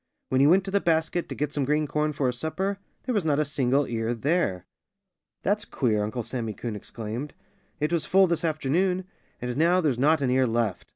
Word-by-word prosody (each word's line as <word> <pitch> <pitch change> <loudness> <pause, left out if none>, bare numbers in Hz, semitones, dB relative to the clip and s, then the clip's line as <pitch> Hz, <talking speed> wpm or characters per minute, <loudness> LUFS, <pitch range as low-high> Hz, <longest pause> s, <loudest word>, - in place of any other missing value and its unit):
When 130 0 +3
he 140 - +6
went 185 +4 +5
to 195 - -5
the 200 - +3
basket, 165 +1 0
to - - -5
get 145 0 -2
some 145 - 0
green 150 +3 +1
corn 150 +1 0
for 140 -2 -2
his 125 -1 -1
supper, 190 +6 -2 0.2
there 255 - -2
was 205 -5 +1
not 150 -3 +2
a 150 - +2
single 140 -1 +1
ear 115 0 -2
there. 115 - 0 0.8
"That's 205 +2 +1
queer!" 115 - 0
Uncle 110 +3 -3
Sammy 115 -2 -4
Coon 115 -3 -4
exclaimed. 115 +6 -6 0.4
"It 150 +3 0
was 160 -3 +1
full 195 +1 +5
this 170 -2 -1
afternoon. 170 +4 0 0.4
And 125 0 -2
now 170 +4 +4
there's 145 -8 +1
not 150 +3 +4
an 130 -2 +1
ear 130 0 +3
left. 115 -4 -1
145 Hz, 215 wpm, -26 LUFS, 125-170 Hz, 0.8 s, he